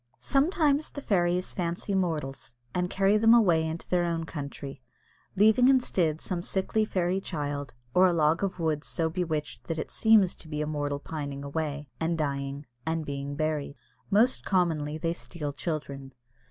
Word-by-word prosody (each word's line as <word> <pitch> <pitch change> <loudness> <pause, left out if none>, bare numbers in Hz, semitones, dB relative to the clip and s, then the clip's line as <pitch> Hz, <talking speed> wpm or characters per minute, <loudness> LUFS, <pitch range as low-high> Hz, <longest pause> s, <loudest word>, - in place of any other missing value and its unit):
Sometimes 295 0 +2
the - - -6
fairies 180 -6 +1
fancy 175 +3 -2
mortals, 150 -10 -2 0.2
and 180 0 0
carry 195 +2 +3
them 225 +2 +6
away 175 -9 +4
into 160 +1 -5
their 180 -1 +2
own 165 -1 -1
country, 140 -3 -7 0.5
leaving 220 +5 +5
instead 185 - +2
some 180 0 -2
sickly 195 +5 0
fairy 185 -1 0
child, 145 -6 -4 0.2
or 185 +1 +6
a - - +3
log 160 +2 +2
of 195 -2 -1
wood 160 -3 -1
so 165 -2 0
bewitched 160 -4 -3
that 165 - -3
it 155 - -4
seems 220 -5 +4
to - - -12
be 150 -1 -4
a 150 - 0
mortal 145 -1 -2
pining 145 -2 -5
away, 145 0 -3
and 165 +1 0
dying, 140 -1 -3 0.2
and 160 +1 -2
being 140 0 -4
buried. 150 -2 -2 0.3
Most 220 +6 +4
commonly 160 -5 +1
they 165 +1 -1
steal 150 -4 -5
children. 140 -4 -5
165 Hz, 165 wpm, -28 LUFS, 145-185 Hz, 0.5 s, them